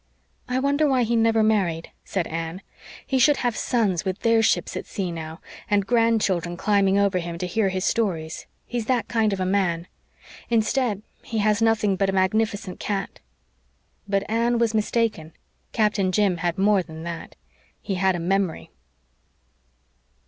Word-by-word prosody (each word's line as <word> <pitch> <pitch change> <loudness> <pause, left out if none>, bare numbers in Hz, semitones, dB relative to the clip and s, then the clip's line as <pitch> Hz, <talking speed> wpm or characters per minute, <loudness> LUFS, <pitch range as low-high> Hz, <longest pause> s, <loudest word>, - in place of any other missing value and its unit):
"I 250 - 0
wonder 285 +3 +2
why 260 -3 +3
he 235 +1 0
never 225 -1 +3
married," 185 -7 +1
said 185 -4 -2
Anne. 165 +3 -5 0.4
"He 265 -2 0
should 290 +3 +5
have 240 -2 +1
sons 205 -8 0
with 190 -1 -2
their 230 -1 +4
ships 225 - +1
at - - -5
sea 185 -3 -3
now, 160 -1 -7 0.3
and 205 -1 +2
grandchildren 210 -7 +1
climbing 200 -1 +2
over 200 -2 +2
him 170 -1 -5
to 180 - -3
hear 195 +3 +1
his 185 0 -2
stories 165 -8 -1 0.2
he's 235 -2 -4
that 250 -3 +1
kind 225 -2 +1
of 195 - -2
a 185 - 0
man. 185 -3 0 0.6
Instead, 225 -2 +1 0.2
he 225 - -5
has 210 +1 +2
nothing 220 -3 +2
but 195 0 +1
a - - -1
magnificent 200 0 0
cat." 200 -2 -3 0.9
But 200 0 0
Anne 235 +2 +1
was 230 -1 +1
mistaken. 215 -7 0 0.4
Captain 210 -4 +1
Jim 195 -2 +2
had 170 0 -1
more 200 0 +3
than 160 -2 -9
that. 170 -1 -7 0.4
He 200 - -4
had 190 0 +2
a - - -3
memory. 185 0 -1
200 Hz, 165 wpm, -24 LUFS, 180-225 Hz, 0.9 s, should